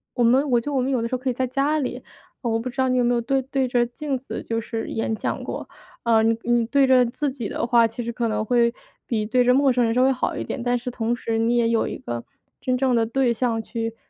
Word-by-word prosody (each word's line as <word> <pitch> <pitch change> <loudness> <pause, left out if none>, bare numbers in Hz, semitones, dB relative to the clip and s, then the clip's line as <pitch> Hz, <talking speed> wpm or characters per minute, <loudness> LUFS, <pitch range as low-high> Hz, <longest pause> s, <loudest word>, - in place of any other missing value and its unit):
我 245 - +2
们 265 +5 +4
我 240 - +4
觉 - - -20
得 - - -3
我 260 - +2
们 265 - -1
有 255 -3 +1
的 - - -1
时 235 - -8
候， - - -3
可 260 +1 -2
以 250 - 0
在 260 +2 -1
家 275 +4 +1
里 270 - -4 0.4
我 230 -3 0
不 235 - -5
知 270 - -20
道 260 0 +2
你 255 - +2
有 245 - +3
没 245 - +2
有 235 - +1
对 270 +3 0
对 265 0 -1
着 245 -1 +2
镜 270 +3 -3
子 260 - -7
就 230 0 -2
是 225 0 -4
演 225 0 -1
讲 - - -3
过？ - - -6 0.3
呃， 225 -2 +4
你 225 0 +3
你 240 -1 +2
对 275 +2 +3
着 255 -1 +5
自 285 +5 -2
己 255 -5 -5
的 - - -2
话， 235 -1 +5
其 230 +2 -6
实 235 - -3
可 235 0 -1
能 215 0 -1
会 235 0 +3 0.3
比 220 -3 -1
对 250 +2 +3
着 250 +1 +4
陌 275 0 +4
生 245 -1 +2
人 225 - +1
稍 250 +1 +3
微 265 - +4
好 255 - -1
一 - - -3
点， 250 - -5
但 245 0 +1
是 245 - -5
同 235 -1 -1
时 230 -2 -2
你 230 +2 +2
也 235 -1 +3
有 230 -1 +1
一 - - -5
个 120 0 -5 0.3
真 255 - 0
正 255 -1 +2
的 230 -1 +2
对 245 +1 +1
象 230 -1 0
去 225 0 -4
240 Hz, 315 characters per minute, -23 LUFS, 230-260 Hz, 0.4 s, 着